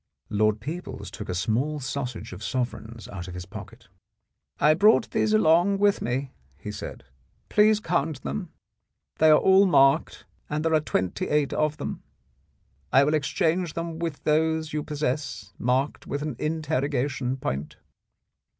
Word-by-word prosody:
Lord 105 +1 +2
Peebles 145 - -6
took - - -8
a 90 - -2
small 130 - 0
sausage 130 -5 -4
of 95 +4 -9
sovereigns 115 -2 -4
out 95 -2 -7
of 90 - -8
his 90 0 -6
pocket. - - -11 0.7
"I 150 - +5
brought 215 +7 +4
these 215 - +1
along 195 -1 +4
with 205 0 +3
me," 130 +3 -2 0.3
he 105 +8 -6
said, - - -7 0.5
"please 210 0 +4
count 160 -7 -1
them; 70 +1 -4 0.7
they 155 - +6
are 155 - +8
all 190 +1 +5
marked, 135 -6 +3 0.2
and 150 +2 -2
there 165 - +2
are 155 - +5
twenty 95 -11 -2
eight 150 -2 +1
of 155 0 0
them. 145 - -5 0.9
I 135 - +6
will 150 +2 +1
exchange 165 +3 0
them 165 -1 -4
with 165 -4 -4
those 160 0 +1
you 150 - 0
possess 130 -8 -3
marked 130 +4 0
with 140 +1 -3
an 150 -4 -3
interrogation 140 -4 -1
point." 70 - -4
145 Hz, 150 wpm, -26 LUFS, 125-160 Hz, 0.9 s, are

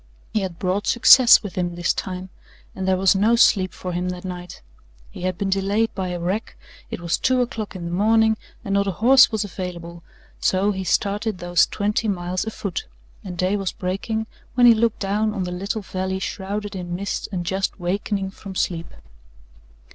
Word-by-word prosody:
He 215 - +1
had 185 -3 -4
brought 190 +3 -1
success 240 0 +7
with 200 -4 -6
him 175 -1 -2
this 175 0 +1
time 185 0 -5 0.5
and 190 0 -3
there 190 -1 +3
was 190 0 +4
no 210 +4 +3
sleep 190 -5 +4
for 180 - -6
him 180 +1 -2
that 180 0 -6
night. 180 - -7 0.5
He - - -10
had 185 -1 -2
been 195 -1 -2
delayed 200 +4 +1
by 190 -2 -3
a 180 -1 -4
wreck, 190 +6 -3 0.3
it - - -5
was 170 -1 -1
two 255 -1 +2
o'clock 225 -4 -3
in 175 -2 -6
the 170 - -4
morning, 220 +4 +3 0.3
and 195 - -2
not 200 0 +2
a 195 - -1
horse 255 +8 +6
was 220 -1 0
available; 175 -3 -7 0.4
so 195 +2 +2
he 190 -1 -4
started 205 +3 0
those 175 0 +2
twenty 210 +2 -1
miles 185 -1 -2
afoot, 200 - -4 0.4
and 180 -2 -7
day 185 +3 +1
was 195 -3 -2
breaking 195 +4 -3 0.3
when 245 -1 +5
he 235 - +9
looked 225 0 +1
down 210 +2 0
on 195 - -1
the 180 - -4
little 200 +4 -3
valley 190 0 -3
shrouded 200 +2 -4
in 175 -2 -4
mist 200 +2 -3
and 180 -3 -3
just 195 +3 -2
wakening 195 +2 -2
from 195 0 -10
sleep. 170 -2 -2
190 Hz, 195 wpm, -22 LUFS, 180-210 Hz, 0.5 s, he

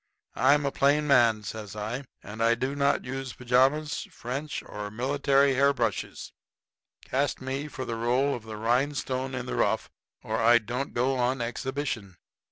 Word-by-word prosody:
"I'm 145 +2 +4
a 140 - 0
plain 145 +3 +3
man," 120 -6 +4
says 105 -1 -7
I, 115 +6 -4 0.2
"and 110 +2 -7
I 115 +1 +4
do 130 +4 -2
not 140 0 +1
use 135 0 -5
pajamas, 130 +5 +1
French, 135 +5 -5
or 105 0 -6
military 140 +4 +2
hair 140 +2 +4
brushes. 115 -6 -3 0.7
Cast 140 +2 0
me 135 +3 -3
for 130 -2 -6
the 115 - -3
role 125 +5 +1
of 120 - -4
the 110 -1 -8
rhinestone 130 +2 0
in 125 -1 -4
the 125 - -4
rough 110 +2 0 0.3
or 110 0 -2
I 120 +1 +6
don't 120 +4 -4
go 130 +2 +1
on 125 +2 +1
exhibition. 120 -5 -3
130 Hz, 165 wpm, -27 LUFS, 115-140 Hz, 0.7 s, I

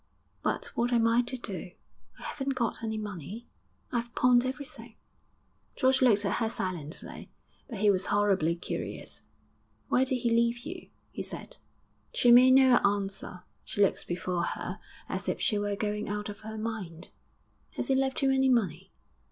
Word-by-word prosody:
'But - - -2
what 240 +1 +1
am 235 -2 +3
I 230 +1 +4
to 255 +2 -4
do? 185 -6 -4 0.4
I - - -13
haven't 270 -1 -3
got 240 -2 -1
any 220 -1 -2
money; 210 - -6 0.4
I've 240 -1 -3
pawned 245 -1 +5
everything.' 280 +3 -7 0.8
George 260 +1 +3
looked 210 -5 +4
at 200 - 0
her 225 -2 0
silently; 175 -7 -5 0.4
but 230 - -5
he 210 -1 +6
was 190 -1 0
horribly 195 -5 +2
curious. 170 - -5 0.7
'Why 255 - +4
did 265 0 +1
he 240 -1 0
leave 235 +1 +2
you?' - - -7 0.2
he - - -5
said. - - -4 0.6
She 240 - +5
made 255 +2 +8
no 260 -2 +7
answer; 200 -2 0 0.2
she 205 - -3
looked 195 - 0
before 175 0 -2
her - - -4 0.3
as - - -3
if - - -2
she 210 - +1
were 205 0 -1
going 210 0 -2
out 210 0 -3
of 205 0 -8
her 220 0 -7
mind. 205 -6 -5 0.7
'Has - - -3
he - - +4
left 265 +1 0
you 270 - +4
any 265 0 +3
money?' 190 -7 0
220 Hz, 170 wpm, -29 LUFS, 200-245 Hz, 0.8 s, made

